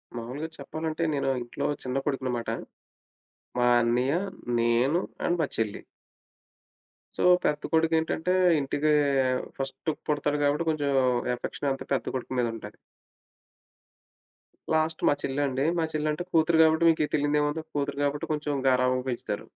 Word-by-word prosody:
మావులుగా 125 Hz, +7 st, -5 dB
చెప్పాలంటే, 155 Hz, +3 st, -4 dB
నేనో 140 Hz, -1 st, 0 dB
ఇంట్లో 120 Hz, +4 st, -5 dB, 0.2 s
చిన్న 130 Hz, +1 st, -2 dB
కొడుకునమాట. 130 Hz, -4 st, -2 dB, 1.1 s
మా 120 Hz, 0 st, +3 dB
అన్నయ్య, 120 Hz, +3 st, +1 dB, 0.5 s
నేను 120 Hz, +7 st, +2 dB, 0.3 s
అండ్ 175 Hz, -, +1 dB
మా -, -, +2 dB
చెల్లి. 110 Hz, -2 st, -2 dB, 1.3 s
సో, -, -, -4 dB, 0.2 s
పెద్ద 150 Hz, 0 st, +1 dB
కొడుకేంటంటే, 160 Hz, +1 st, +1 dB, 0.3 s
ఇంటికీ 145 Hz, +2 st, 0 dB, 0.7 s
ఫస్టు 135 Hz, +3 st, -3 dB, 0.2 s
పుడతాడు 145 Hz, 0 st, 0 dB
గాబట్టి, 145 Hz, +3 st, +1 dB
కొంచం 145 Hz, -2 st, -1 dB, 0.4 s
ఎఫెక్షనంతా 135 Hz, +2 st, -3 dB
పెద్ద 135 Hz, -, 0 dB
కొడుకు 130 Hz, 0 st, -4 dB
మీద 120 Hz, -, +2 dB
ఉంటది. 105 Hz, -2 st, -9 dB, 2.0 s
లాస్ట్ 160 Hz, 0 st, +1 dB
మా -, -, +5 dB
చెల్లండి. 135 Hz, 0 st, -1 dB
మా -, -, +2 dB
చెల్లంటే 155 Hz, +2 st, -1 dB
కూతురు 160 Hz, 0 st, +3 dB
గాబట్టి, 160 Hz, +1 st, +4 dB
మీకీ 160 Hz, -2 st, +2 dB
తెలీందేముంది. 150 Hz, +1 st, +1 dB
కూతురు 145 Hz, -1 st, -2 dB
గాబట్టి 145 Hz, 0 st, -1 dB
కొంచుం 150 Hz, -2 st, -2 dB
గారాబంగా 125 Hz, 0 st, +2 dB
పెంచుతారు. 115 Hz, -4 st, -4 dB
145 Hz, 120 wpm, -27 LUFS, 130-155 Hz, 2.0 s, మా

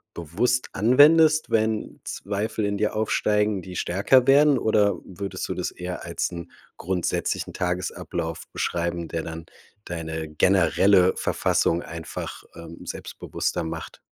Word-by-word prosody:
bewusst 110 Hz, +11 st, 0 dB
anwendest, 155 Hz, +7 st, +5 dB
wenn 110 Hz, -1 st, 0 dB
Zweifel 105 Hz, +2 st, -3 dB
in 100 Hz, 0 st, -1 dB
dir 105 Hz, -, 0 dB
aufsteigen, 105 Hz, -2 st, +1 dB
die 90 Hz, 0 st, -9 dB
stärker 100 Hz, +10 st, +3 dB
werden 140 Hz, +1 st, +5 dB
oder 105 Hz, -2 st, +2 dB
würdest 95 Hz, +1 st, -5 dB
du -, -, -2 dB
das -, -, -3 dB
eher 90 Hz, 0 st, -6 dB
als 85 Hz, +1 st, -2 dB
'n 85 Hz, 0 st, -8 dB, 0.3 s
grundsätzlichen 90 Hz, 0 st, -2 dB
Tagesablauf 90 Hz, -2 st, -3 dB
beschreiben, 85 Hz, -1 st, -2 dB
der 80 Hz, 0 st, -3 dB
dann 80 Hz, 0 st, -7 dB, 0.4 s
deine 80 Hz, -2 st, -5 dB
generelle 95 Hz, +3 st, +4 dB
Verfassung 85 Hz, +1 st, +1 dB
einfach, 85 Hz, -1 st, -7 dB
ähm, 85 Hz, 0 st, -11 dB
selbstbewusster -, -, -4 dB
macht. 80 Hz, 0 st, -6 dB
95 Hz, 125 wpm, -24 LUFS, 85-110 Hz, 0.4 s, anwendest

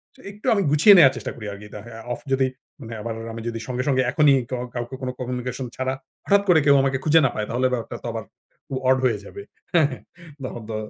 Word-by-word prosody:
যে -, -, -18 dB
একটু 205 Hz, +1 st, -16 dB
আমি 200 Hz, -, +2 dB
গুছিয়ে 160 Hz, +8 st, +7 dB
নেওয়ার 135 Hz, -6 st, +7 dB
চেষ্টা 110 Hz, -, -5 dB
করি 110 Hz, -, -9 dB
আরকি 100 Hz, +1 st, -10 dB
আ -, -, -10 dB, 0.3 s
অফ -, -, -7 dB
যদি 135 Hz, 0 st, +3 dB, 0.3 s
মানে 115 Hz, -2 st, -8 dB
আবার 115 Hz, +1 st, -4 dB, 0.2 s
আমি 115 Hz, -, -6 dB
যদি 115 Hz, -1 st, -3 dB
সঙ্গে, 125 Hz, 0 st, -2 dB
সঙ্গে 130 Hz, -2 st, +3 dB
এখনই 150 Hz, 0 st, +5 dB, 0.2 s
কা 130 Hz, -, -1 dB, 0.2 s
কাউকে 120 Hz, +2 st, -4 dB
কোন 130 Hz, -, -2 dB
কমিউনিকেশন 125 Hz, 0 st, -4 dB
ছাড়া 130 Hz, 0 st, -1 dB, 0.3 s
হঠাৎ 200 Hz, 0 st, +4 dB
করে 170 Hz, -3 st, +7 dB
কেউ 140 Hz, -1 st, +6 dB
আমাকে 135 Hz, 0 st, +1 dB
খুঁজে 160 Hz, +1 st, +5 dB
না -, -, +3 dB
পায় 105 Hz, -, -2 dB
তাহলে 125 Hz, +2 st, +1 dB
ব্যাপারটা 115 Hz, -2 st, -4 dB
তো -, -, -4 dB
আবার -, -, -4 dB, 0.4 s
খুব 135 Hz, -, -3 dB
ওড 130 Hz, -, +5 dB
হয়ে 115 Hz, -4 st, +2 dB
যাবে 200 Hz, -, -9 dB, 0.3 s
হ্যাঁ, 165 Hz, -4 st, +5 dB
হ্যাঁ। 130 Hz, -, -8 dB, 0.4 s
তখন 120 Hz, -2 st, -5 dB
তো 110 Hz, -, -3 dB
130 Hz, 230 wpm, -23 LUFS, 120-140 Hz, 0.4 s, গুছিয়ে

